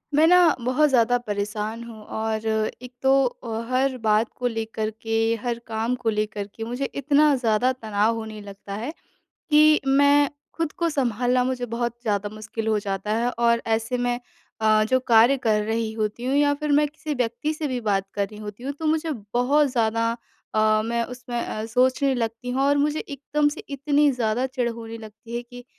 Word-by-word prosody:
मैं 310 +2 +6
ना, 355 -3 +6
बहुत 260 +5 +2
ज़्यादा 245 -2 +3
परेशान 210 0 -4
हूँ 230 -2 -10 0.2
और 220 0 -2
एक 220 +3 -2
तो 265 0 +3
अ, 230 -2 -4
हर 260 +1 +1
बात 220 0 +2
को 250 - 0
लेकर 225 -2 -3
के, 225 0 +1
हर 235 -1 -2
काम 225 +2 -1
को 225 - +2
लेकर 210 -1 -2
के 225 - -5
मुझे 245 +4 -3 0.2
इतना 295 +1 +4
ज़्यादा 245 0 +2
तनाव 220 -2 0
होने 220 -1 -6
लगता 200 0 -9
है। 235 +8 -4 0.6
कि 305 0 +6
मैं 285 +1 +5 0.3
खुद 330 -2 -2
को 340 -1 -1
सँभालना 250 -2 +1
मुझे 250 -1 -2
बहुत 240 0 -1
ज़्यादा 205 -3 -1
मुश्किल 220 +1 -6
हो 215 -1 +2
जाता 200 0 -3
है 235 +2 +1
और 235 0 +3
ऐसे 225 +2 0
में 245 0 0 0.4
अ, 215 0 +4
जो 260 +4 +2
कार्य 240 +2 +5
कर 210 -1 +3
रही 220 0 -1
होती 220 +2 -3
हूँ 260 +2 0
या 290 0 +4
फिर 300 0 -2
मैं 300 0 +2
किसी 305 0 -5
व्यक्ति 245 +4 -1
से 310 0 -3
भी 255 -2 -2
बात 200 -3 0
कर 200 -1 0
रही 210 +1 -12
होती 210 +3 -8
हूँ। 280 - -2
तो 320 - -3
मुझे 320 +1 +1 0.2
बहुत 280 +4 +3
ज़्यादा 230 -1 +1 0.4
अ, 215 0 +3
मैं 235 +1 0
उसमें 245 0 -5
अ, 215 - -4
सोचने 255 +3 +2
लगती 230 +1 -3
हूँ 260 +2 0
और 285 +1 +3
मुझे 300 +2 +1
एकदम 290 +1 -1
से 295 - -6
इतनी 285 +1 +2
ज़्यादा 240 0 0
चिढ़ 255 -2 -1
होने 230 0 -8
लगती 220 +2 -9
है 240 - -3
कि 245 0 -12
235 Hz, 195 wpm, -24 LUFS, 220-270 Hz, 0.6 s, मैं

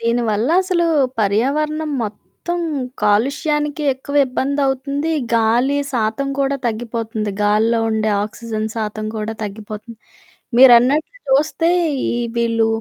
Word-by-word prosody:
దీని 230 +1 +1
వల్లసలూ, 340 - +1 0.4
పర్యావరణం 300 +9 0
మొత్తం 280 +11 -6 0.4
కాలుష్యానికే 295 +7 +1
ఎక్కువ 280 +2 -6
ఇబ్బందవుతుంది, 275 +3 -1 0.2
గాలి 235 +5 +2 0.2
శాతం 230 +3 -1
కూడా 275 0 +1
తగ్గిపోతంది, 225 -1 -3
గాల్లో 215 +3 +2
ఉండే 220 0 0
ఆక్సిజన్ 220 0 -4
శాతం 215 -1 -3
కూడా 215 +1 -3
తగ్గిపోతంది. 215 +2 -7 0.6
మీరన్నట్లు 265 - +5
చూస్తే, 310 +5 +2 0.4
ఈ - - -1 0.2
వీళ్ళు 230 -1 +2
235 Hz, 100 wpm, -19 LUFS, 220-280 Hz, 0.6 s, మీరన్నట్లు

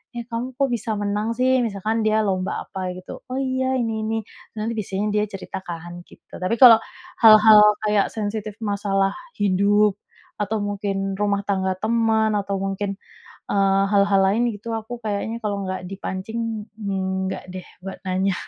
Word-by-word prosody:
"Eh, 235 - -4
kamu 240 +2 -4
kok 275 +1 +1
bisa 225 -2 -2
menang, 205 +2 -1
sih?" 255 +1 +3
Misalkan 220 +1 -1
dia 215 0 +2
lomba 190 -2 -1
apa, 190 -1 -5
gitu, 185 0 -9
"Oh, 255 - -5
iya, 260 -1 0
ini 225 -3 -1
ini." 225 +1 -1 0.4
Nanti 215 +1 -2
biasanya 205 0 -2
dia 210 0 +1
cerita, 195 -1 -7
kan, 175 0 -7
gitu. - - -14
Tapi 185 +5 0
kalau 230 -3 +10 0.4
hal-hal 215 -1 +8 0.2
kayak 210 -2 +2
sensitif 215 -1 -3
masalah 200 -1 0 0.2
hidup, 205 +1 +2 0.4
atau 210 +2 -1
mungkin 195 -1 -2
rumah 205 -1 +1
tangga 190 -1 0
teman, 220 0 +2
atau 200 0 -3
mungkin, 195 +1 -2 0.5
eee, 195 -1 +3
hal-hal 200 -1 +4
lain, 230 +5 +2
gitu, 220 +2 -6
aku 225 +2 -5
kayaknya 215 +2 -2
kalau 205 -2 -2
nggak 185 -1 -4
dipancing 210 +3 -4
enggak, 190 -2 -2
deh, 185 -1 -7 0.2
buat 190 - -6
nanya. 190 +1 0
205 Hz, 155 wpm, -22 LUFS, 195-220 Hz, 0.5 s, kalau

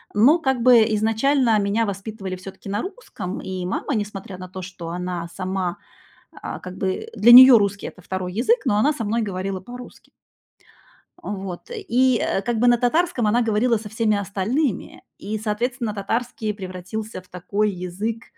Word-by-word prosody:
Но, 275 +11 +5
как-бы, 250 -4 +4
изначально 225 +2 +2
меня 205 +3 +1
воспитывали 195 -1 -5
всё-таки 185 +2 -11
на 205 +2 -1
русском, 375 - -7
и 185 -1 -5
мама, 190 +10 -2
несмотря 205 -3 -5
на 185 - -7
то, 185 +1 -7
что 175 -2 -8
она 180 -1 -4
сама, 185 -2 -3 0.6
а, - - -6
как 185 0 -9
бы, 190 - -2
для 235 +3 +6
неё 255 0 +11
русский- 200 0 -1
это 180 - -11
2 180 0 -4
язык, 280 - +1
но 205 -5 +2
она 285 +9 +3
со 250 - -4
мной 225 +3 0
говорила 190 -2 -3
по-русски. 245 +5 -12 1.1
Э, - - -6
вот, 190 - -6
и, 260 - +1
э, 195 - 0
как 230 +2 -2
бы, 245 - +3
на 240 0 +5
татарском 250 0 +1
она 235 +4 +3
говорила 230 +1 +2
со 210 0 -9
всеми 220 -1 +1
остальными, 200 - -2
и, 215 +2 -4
соответственно, 225 +2 -2
татарский 220 +2 -3
превратился 190 +2 -6
в 185 - -25
такой 200 +4 -1
язык, 195 +5 -4
210 Hz, 165 wpm, -22 LUFS, 190-240 Hz, 1.1 s, неё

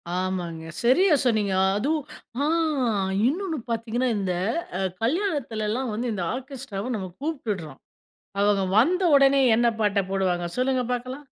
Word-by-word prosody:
ஆமாங்க, 180 -3 -3 0.2
சரியா 320 +9 +5
சொன்னீங்க. 215 -5 +2 0.2
அதுவும் 290 +7 0 0.4
ஆ - - +2 0.8
இன்னொன்னு 335 +1 -1
பாத்தீங்கன்னா, 230 +2 -1
இந்த 190 -2 -1 0.5
அ - - -3 0.2
கல்யாணத்துலல்லாம் 250 - -1
வந்து 240 +3 -2
இந்த 185 -4 -3
ஆர்கெஸ்ட்ராவ 255 -4 -5
நம்ப 190 -3 -4
கூப்பிடுறோம். 205 - -4 0.6
அவங்க 205 -1 +3 0.2
வந்த 360 - +4
உடனே 275 0 +5
என்ன 235 +1 +3
பாட்ட 205 -1 +2
போடுவாங்க? 185 -3 0
சொல்லுங்க 255 0 +1
பார்க்கலாம். 255 +4 -5
235 Hz, 120 wpm, -25 LUFS, 200-275 Hz, 0.8 s, சரியா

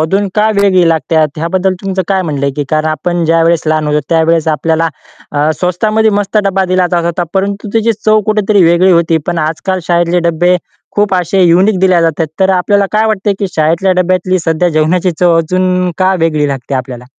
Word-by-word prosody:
अजून 195 +6 0
का 215 +1 +2
वेगळी 185 -4 +3
लागते 160 -1 +1
ह्याबद्दल 185 +3 -1
तुमचं 190 -1 -2
काय 190 -1 +1
म्हणलं 145 -5 -3
आहे 140 - -1
की 145 - -2
कारण 155 0 0
आपण 175 +2 -2
ज्यावेळेस 165 0 +2
लहान 155 -1 0
होतो, 150 0 0
त्यावेळेस 165 -1 +1
आपल्याला 160 +1 0 0.4
अ, 145 +1 +1
स्वस्तामध्ये 215 +5 +1
मस्त 205 +1 -3
डब्बा 195 -1 0
दिला 185 -1 +2
जात 170 -1 0
होता 170 +1 -1
परंतु 200 +2 -2
त्याची 225 0 +1
चव 215 0 +4
कुठेतरी 210 -2 +2
वेगळी 175 +3 +3
होती. 170 -1 +2
पण 175 -1 -2
आजकाल 165 +4 -2
शाळेतले 175 0 +1
डब्बे 175 +2 +2 0.4
खूप 205 -2 +1
असे 185 +1 +1
युनिक 185 +4 +3
दिल्या 185 -2 +3
जातात. 165 0 0
तर 190 0 +3
अ, - - +2
आपल्याला 200 +2 +1
काय 215 +1 +2
वाटते, 210 -2 0
की 200 - -1
शाळेतल्या 165 +4 +1
डब्यातली 185 +1 0
सध्या 165 +2 +1
जेवणाची 165 +3 +1
चव 175 -2 +3
अजून 180 +2 0
का 190 0 +2
वेगळी 155 -3 0
लागते 135 0 -4
आपल्याला? 125 -1 -5
175 Hz, 190 wpm, -12 LUFS, 160-190 Hz, 0.4 s, चव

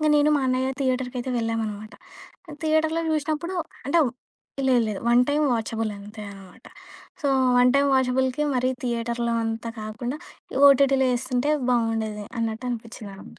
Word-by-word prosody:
ఇంక 305 - +1
నేను 295 +1 +4
మా - - 0
అన్నయ్య 255 +1 +1
థియేటర్‌కయితే 255 -1 -1
వెళ్ళామనమాట. 220 -2 -3 0.6
ఆ - - -8
థియేటర్లో 315 +1 +2
చూసినప్పుడు 310 +4 -2 0.3
అంటే 330 +4 +3 0.7
లేదు 250 -2 +4
లేదు. 210 -2 -4
1 240 +1 +5
టైమ్ 295 +1 +2
వాచబుల్ 225 -1 -2
అంతే 210 +2 -10
అనమాట. 195 -2 -15 0.5
సో 290 - -2 0.3
1 250 0 +6
టైమ్ 280 0 +3
వాచబుల్‌కి 260 +1 +1
మరి 255 0 +1
థియేటర్‌లో, 235 0 -1
అంతా 225 +1 -3
కాకుండా 240 +6 -5 0.5
ఓటీటీలో 275 -1 +4
ఏస్తుంటే 255 +3 -1 0.2
బావుండేది 225 -3 0
అన్నట్టు 225 +2 -2
అనిపించిందనమాట. 220 -4 -8
245 Hz, 135 wpm, -24 LUFS, 225-270 Hz, 0.7 s, 1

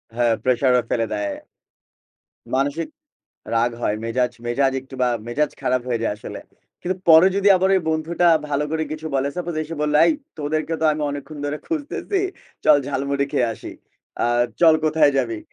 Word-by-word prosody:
হ্যাঁ, 120 -1 +2
pressure 130 +1 +3
ও - - 0
ফেলে 115 -1 +1
দেয়। 105 -1 -2 1.2
মানসিক 140 +5 0 0.7
রাগ 115 +1 +2
হয়, 105 -3 0
মেজাজ 120 +1 0
মেজাজ 135 +3 +1
একটু 135 +1 -14
বা 125 - +3 0.2
মেজাজ 145 +6 0
খারাপ 125 0 0
হয়ে 120 -2 -1
যায় 115 - 0
আসলে। 105 - -8 0.4
কিন্তু 185 +1 -2
পরে 160 +2 +8
যদি 200 0 +3
আবার 190 +1 +2
ওই 190 - +3
বন্ধুটা 160 +2 0 0.2
ভালো 145 0 0
করে 160 0 -1
কিছু 155 +1 -6
বলে, 135 +1 +1
suppose 175 -2 -3
এসে 160 +1 -6
বলল, 150 0 0
"এই - - +4 0.3
তোদেরকে 155 +2 -2
তো - - 0
আমি 150 0 -3
অনেকক্ষণ 145 +2 -7
ধরে 145 +1 -2
খুঁজতেছি। 330 +5 -2 0.4
চল 150 - +7
ঝালমুড়ি 140 0 -1
খেয়ে 120 - +2
আসি। - - -9 0.5
আ - - +2 0.3
চল 165 -2 +7
কোথায় 155 -1 +4
যাবি?" 115 -4 -1
145 Hz, 175 wpm, -22 LUFS, 125-160 Hz, 1.2 s, পরে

